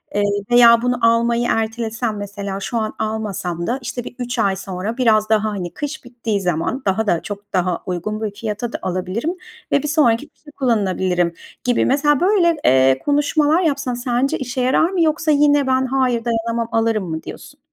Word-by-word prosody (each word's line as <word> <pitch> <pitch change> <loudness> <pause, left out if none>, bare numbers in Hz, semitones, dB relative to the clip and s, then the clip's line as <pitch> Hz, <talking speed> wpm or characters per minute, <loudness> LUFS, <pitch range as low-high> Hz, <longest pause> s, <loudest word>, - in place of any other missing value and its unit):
eee, 205 - +2 0.3
veya 235 -1 +7
bunu 245 0 0
almayı 235 +1 +2
ertelesem, 225 0 -2
mesela, 200 -1 -5
şu 235 +4 -3
an 215 -1 -2
almasam 200 -6 -3
da, 250 +3 -1
işte, 245 +1 -5
bir 245 - -9
3 245 0 -3
ay 200 -3 +2
sonra 195 +4 -5
biraz 215 -4 +3
daha, 220 -1 +3
hani, 185 -5 -5
kış 295 +1 -5
bittiği 230 -4 -3
zaman 180 - -1
daha 205 +3 0
da 170 -4 +1
çok 205 0 -8
daha 180 -1 0
uygun 190 +4 -3
bir 215 -2 -2
fiyata 215 +2 -4
da - - -3
alabilirim 185 - -2 0.4
ve 280 - +2
bir 300 - -2
sonraki 290 -2 +2
kışa 295 +1 -18
kullanılabilirim." 190 -9 0 0.3
gibi, 245 -1 +2
mesela, 290 +1 +2
böyle, 355 -4 +3
eee, 130 0 +4
konuşmalar 295 +3 +2
yapsan 280 -6 0
sence 245 +2 0
işe 260 0 -3
yarar 260 +6 +3
mı 370 -2 -1
yoksa 315 -1 +2
yine, 290 -1 +3
"Ben, 260 0 +2
hayır, 255 -3 0
dayanamam, 230 0 -1
alırım." 225 -5 0
mı 160 0 -4
diyorsun? 290 - -10
230 Hz, 180 wpm, -19 LUFS, 205-265 Hz, 0.4 s, veya